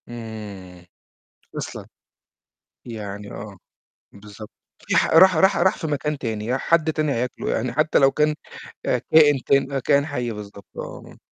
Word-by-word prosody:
آمم، 105 -6 -9 0.7
أصلًا. - - -6 1.0
يعني 105 -3 -7
آه، 105 -1 -9 0.6
بالضبط. 105 +1 -12 0.4
في - - +2
ح - - +4
راح 185 +2 +6
راح 190 +4 +4
راح 185 +2 +3
في - - -3
مكان 150 0 -2
تاني، 110 -4 -4
ي 125 +3 0
حد 160 +2 +2
تاني 155 -2 0
هياكله، 125 0 -3
يعني 120 +1 -1
حتى 155 +4 +2
لو 135 -1 +5
كان 150 +2 +1 0.5
كائن 150 -3 +4
كان 135 0 +2
كائن 140 +2 +2
حي 125 -6 -3
بالضبط 100 -2 -10
آه. - - -9
125 Hz, 145 wpm, -22 LUFS, 105-150 Hz, 1.0 s, راح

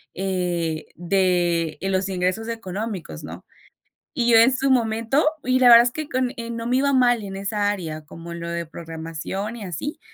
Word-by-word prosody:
eh, 175 -4 -2
de 175 -2 +1
los 195 0 0
ingresos 185 +4 -1
económicos, 210 -3 -5
¿no? - - -9 0.7
Y 240 -4 +1
yo 230 - +7
en 245 +4 +6
su 270 +1 0
momento 230 +2 +2 0.2
y 255 0 +2
la 250 -1 +7
verdad 235 0 +10
es 245 - +1
que 310 +3 -5
con 255 -3 -1 0.2
no 230 0 -4
me 250 - +1
iba 280 +1 +2
mal 245 -3 +3
en 195 -1 -6
esa 205 +1 0
área, 160 -6 -5
como 165 +2 -9
lo 170 0 -6
de 170 -1 -3
programación 165 +6 -6
y 230 - -8
así, 185 - -5
195 Hz, 180 wpm, -23 LUFS, 175-235 Hz, 0.7 s, verdad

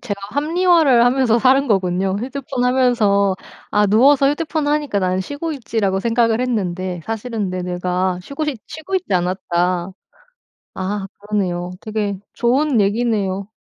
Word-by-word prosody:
제가 205 -5 -5
합리화를 310 -2 +3
하면서 245 -2 +3
살은 265 +3 +4
거군요. 190 -1 +1
휴대폰 255 +1 -3
하면서 220 -7 +2 0.3
아 210 0 +3
'누워서 275 +7 +5
휴대폰 310 0 -2
하니까 295 -8 0
나는 185 0 0
쉬고 285 - -4
있지.'라고 220 -8 -1
생각을 230 +1 +1
했는데 185 -7 -2
'사실은 225 -2 -3
내 185 0 -3
뇌가 180 +1 -1
쉬고 280 - -4
싶 290 -6 -3
쉬고 315 +5 -7
있지 370 - -1
않았다.' 180 0 -1 0.8
아 195 +1 -3
그러네요. 185 -4 -2
되게 210 -2 -2 0.2
좋은 255 +2 +2
얘기네요. 200 -2 0
220 Hz, 320 characters per minute, -19 LUFS, 190-265 Hz, 0.8 s, 누워서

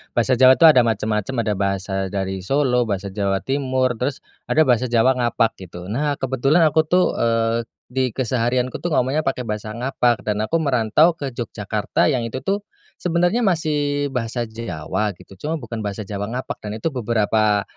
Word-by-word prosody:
Bahasa 120 +1 +2
Jawa 130 0 +8
itu - - +1
ada 155 -5 +8
macam-macam, 110 +2 -1
ada 105 -1 0
bahasa 95 -1 -1
dari 95 0 -3
Solo, 125 +3 +1
bahasa 100 -1 -3
Jawa 95 0 -1
Timur, 130 -2 0
terus 135 +2 -2 0.2
ada 155 - +4
bahasa 125 -3 +2
Jawa 120 +2 +3
ngapak, 115 -1 +1
gitu. 90 0 -9
Nah, 145 +5 0
kebetulan 135 +5 +2
aku, 160 0 +2
tuh, 180 +2 +4
eee, 115 0 +1 0.2
di 130 +1 0
keseharianku, 125 0 0
tuh, 175 -3 -1
ngomongnya 135 +5 +1
pakai 130 -2 -1
bahasa 110 -1 -5
ngapak 120 -1 0
dan 105 -1 -1
aku 110 +9 -1
merantau 135 +3 +3
ke 135 -4 -5
Yogyakarta 105 -3 -1
yang 125 -3 +1
itu, 115 +3 -4
tuh, 195 +9 -2 0.4
sebenarnya 175 +5 +1
masih 145 -4 0
bahasa 120 -1 -2
Jawa, 105 -2 -3
gitu, 95 - -15
cuma 155 +6 -2
bukan 115 -3 -6
bahasa 105 +1 -4
Jawa 100 0 -4
ngapak, 130 - -4
dan 105 0 -5
itu - - -1
beberapa 110 -3 +1
120 Hz, 170 wpm, -21 LUFS, 105-135 Hz, 0.4 s, Jawa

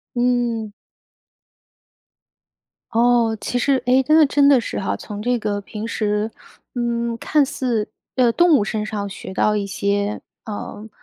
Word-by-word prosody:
嗯。 240 -3 0 2.2
哦， 235 -1 +3
其 245 - -3
实， 265 +1 +2
哎， 250 - +4
那 310 0 +6
真 280 0 +4
的 275 -3 +6
是 - - -4
哈， 100 +1 -2
从 210 - -7
这 245 +2 +1
个 210 -2 -2
平 210 +2 -7
时 210 -1 -1 0.5
嗯， 235 -1 -1
看 295 +2 +2
似 245 -6 -2 0.3
呃， 245 -3 +4
动 345 +2 +5
物 205 - +1
身 215 0 -2
上 205 -2 -4
学 190 -1 -8
到 210 +2 +2
一 205 -1 -1
些 200 +1 -1 0.2
呃， 210 0 -7
230 Hz, 150 characters per minute, -21 LUFS, 210-245 Hz, 2.2 s, 那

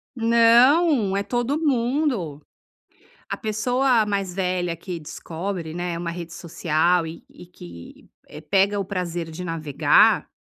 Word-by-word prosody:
Não, 235 - +4
é 200 - 0
todo 245 +6 -1
mundo. 245 - -1 0.9
A - - -2
pessoa 245 +2 +1
mais 200 -3 -2
velha 180 -3 -1
que 175 0 -7
descobre, 165 +2 -6
né, 175 0 -4
uma 170 0 -4
rede 170 -1 -8
social 170 +1 0
e 160 +1 -9 0.2
que 85 - -13 0.4
pega 200 +1 +3
o 195 - -1
prazer 175 -3 -4
de 160 +3 -7
navegar, 155 -3 +2
185 Hz, 120 wpm, -23 LUFS, 170-230 Hz, 0.9 s, Não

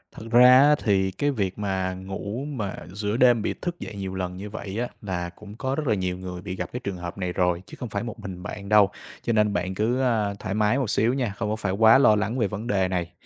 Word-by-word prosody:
Thật - - -9
ra 125 +1 +8
á, 150 +1 +6
thì 95 -3 +2
cái 145 +10 0
việc 100 -7 -2
mà 95 -2 -1
ngủ 100 +6 -5
mà 110 -10 -4 0.2
giữa 105 +2 -2
đêm 120 -3 +5
bị - - -1
thức 175 -1 -4
dậy - - -7
nhiều 95 -1 -5
lần 90 -1 -3
như 105 +2 -7
vậy 100 -1 -6
á, 120 - -1
là 90 -4 -3
cũng 105 +4 -12
có 130 +1 -1
rất 150 -2 -3
là 110 - +3
nhiều 90 -2 -2
người 90 -1 -7
bị 95 -1 -5
gặp 90 -1 -4
cái 125 - -3
trường 100 -6 -5
hợp 85 +2 -6
này 90 -2 -2
rồi, 90 -1 +1
chứ 100 - -11
không 125 - -5
phải 100 +2 -3
một 120 -1 -7
mình 95 -4 -7
bạn 100 -1 -7
đâu, 105 -2 +6 0.3
cho 120 - -1
nên 105 -2 +3
bạn 95 0 -2
cứ, 120 +6 +1
a, 110 -5 +1
thoải 100 -3 -4
mái 105 +4 +2
một 130 -6 -1
xíu 115 +3 +2
nha, 125 -7 -1
không 105 -2 -2
có 110 - 0
phải 105 -3 -2
quá 110 +4 +6
lo 110 -6 +6
lắng 110 +4 -1
về 110 - +2
vấn 105 +3 -5
đề 95 -4 +2
này. 90 -2 -2
105 Hz, 270 wpm, -25 LUFS, 95-115 Hz, 0.3 s, ra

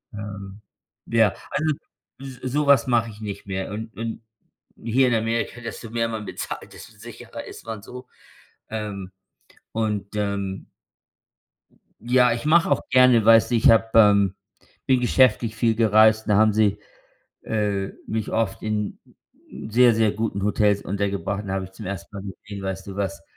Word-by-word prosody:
Ähm, 100 -1 -8 0.5
ja, 115 -3 +4 0.2
also 155 +1 0 0.5
so 130 -2 -8
sowas 140 +1 +3
mache 115 -2 +2
ich 105 -1 -12
nicht 100 -2 -7
mehr. 95 0 -4
Und 110 +2 -7
und 115 0 -5 0.6
hier 125 +3 +2
in 120 - +2
Amerika, 115 +1 -1
desto 115 0 -7
mehr 115 0 -1
man 110 -2 -5
bezahlt, - - -6
desto - - -13
sicherer - - -10
ist - - -11
man 110 -2 -6
so. 125 +3 -11 0.6
Ähm, 100 -3 -5 0.6
und 105 -2 -2
ähm 100 -2 -3 1.3
Ja, 125 +1 +3
ich 115 +4 -3
mache 165 0 +4
auch 140 - +2
gerne, 125 -3 +5
weißt 115 +1 +6
du, 120 - +3
ich 115 - +5
habe, 115 0 +5
ähm 100 -3 +5 0.5
bin 130 -2 +3
geschäftlich 120 -3 +3
viel 115 0 +1
gereist, 110 0 +4
da 105 - +3
haben 110 +1 +5
sie, 105 -1 +2 0.6
äh, 105 -3 -1 0.2
mich 110 -2 -3
oft 110 -4 -1
in 105 -1 -2 0.7
sehr, 120 +1 +5
sehr 110 -1 +3
guten 110 -2 -3
Hotels 105 0 +2
untergebracht 100 0 -2
und - - -11
dann 95 - -2
habe 95 - -2
ich 95 - -12
zum 95 +1 -9
ersten 100 +1 -7
Mal 100 - -6
gesehen, 100 +1 -10
weißt 95 0 -5
du, 100 - -7
was 100 -3 -3
110 Hz, 160 wpm, -23 LUFS, 100-115 Hz, 1.3 s, weißt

